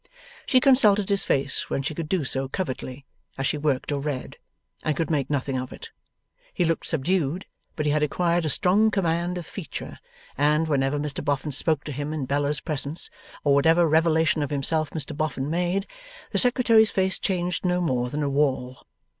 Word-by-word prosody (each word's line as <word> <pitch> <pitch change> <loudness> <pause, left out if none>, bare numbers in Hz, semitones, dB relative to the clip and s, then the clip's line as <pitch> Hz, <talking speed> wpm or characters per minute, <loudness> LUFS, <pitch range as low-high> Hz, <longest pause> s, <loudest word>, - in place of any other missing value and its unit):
She 260 - +5
consulted 215 -7 +4
his 200 -1 +1
face 135 0 0
when 135 - -1
she 150 - -2
could 155 0 -5
do 185 -5 +1
so 135 0 -2
covertly, 135 -4 -5 0.3
as 135 - -2
she 150 - 0
worked 145 -2 0
or 140 -1 -1
read, 140 -3 -4 0.4
and 155 -3 -1
could 165 - -1
make 145 -4 0
nothing 135 -2 -1
of 130 - -6
it. - - -10 0.6
He 175 - +2
looked 165 0 -1
subdued; 165 +2 0 0.3
but 155 - -2
he 150 - +2
had 150 0 +1
acquired 170 +3 +1
a 155 - 0
strong 200 +9 +3
command 175 -3 0
of 175 - -6
feature, 185 -1 -7 0.4
and, 150 +3 +2
whenever 140 -1 +1
Mr 145 -1 -3
Boffin 145 +1 -1
spoke 145 +1 0
to 150 - -6
him 145 +2 -4
in 150 -4 -2
Bella's 145 +1 0
presence, 150 0 -3 0.3
or 145 - +4
whatever 165 +4 +4
revelation 160 0 +3
of 145 - -1
himself 150 +2 0
Mr 155 -1 -4
Boffin 150 -2 -2
made, 180 +3 0 0.5
the - - +2
Secretary's 235 -3 +4
face 190 -1 0
changed 180 -2 -1
no 180 -1 +1
more 125 -8 0
than 150 +3 -2
a - - 0
wall. 135 -3 0
155 Hz, 190 wpm, -25 LUFS, 140-175 Hz, 0.6 s, She